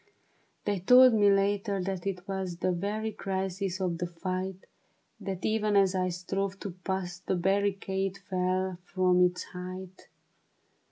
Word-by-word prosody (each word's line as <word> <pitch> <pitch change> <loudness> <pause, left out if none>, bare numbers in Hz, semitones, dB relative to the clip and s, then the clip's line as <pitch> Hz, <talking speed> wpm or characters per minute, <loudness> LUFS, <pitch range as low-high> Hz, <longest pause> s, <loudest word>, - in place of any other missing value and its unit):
They 205 -2 0
told 250 +6 +7
me 205 -2 +5
later 200 0 +2
that 190 0 -3
it 185 -1 -4
was 190 -3 -3
The 185 +1 +1
very 205 +5 -2
crisis 190 -1 -3
of 175 -3 -1
the 175 - -1
fight; 185 +2 -4 0.5
That 190 -2 -4
even 215 -1 +1
as 195 -2 +5
I 185 -1 +1
strove 190 +2 -3
to 200 - -4
pass, 180 0 -4
The 190 - -1
barricade 195 +1 0
fell 185 -1 -1
from 180 0 +2
its 180 0 +2
height. 185 +1 -8
190 Hz, 145 wpm, -29 LUFS, 180-195 Hz, 0.5 s, told